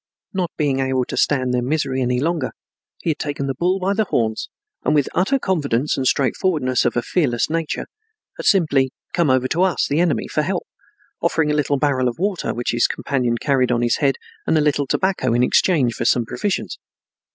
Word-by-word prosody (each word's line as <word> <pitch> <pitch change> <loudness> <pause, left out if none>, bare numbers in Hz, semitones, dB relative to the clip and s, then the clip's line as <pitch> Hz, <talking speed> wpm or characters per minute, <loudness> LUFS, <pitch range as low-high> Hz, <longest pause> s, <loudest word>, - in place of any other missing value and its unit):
Not 185 -3 -1
being 140 -4 +1
able 130 -1 0
to - - -5
stand 130 -3 +1
their 125 - +1
misery 135 0 -1
any 125 0 +1
longer, 155 -2 -1 0.5
he 165 - 0
had 150 - -5
taken 145 -2 -3
the 135 - -1
bull 180 +6 +1
by 190 +2 0
the 215 +1 +1
horns 110 - -1 0.3
and, - - +2
with 145 -2 +3
the - - -10
utter 200 +10 +2
confidence 150 - 0
and 130 -1 -1
straightforwardness 130 -1 +1
of 120 - +1
a 120 - +1
fearless 135 -6 0
nature, 165 -1 -2 0.5
had - - -4
simply 145 -8 +3 0.2
come 170 -5 +2
over 130 0 +3
to 170 - 0
us, 185 -2 +2
the 145 +3 0
enemy, 175 -2 +1
for - - 0
help, - - -2 0.6
offering 155 -2 +1
a - - +1
little 145 -1 +1
barrel 135 -3 +1
of 120 - -3
water 195 0 -1
which 120 +1 -2
his 120 0 +2
companion 125 -4 -1
carried 130 -1 +1
on 120 0 +1
his 120 - +2
head 140 -2 +2 0.3
and 160 - +3
a - - +3
little 145 -1 +1
tobacco, 160 -11 +1
in 120 - +3
exchange 130 -3 +3
for - - -4
some 120 -2 +3
provisions. 200 - -3
140 Hz, 210 wpm, -21 LUFS, 125-165 Hz, 0.6 s, with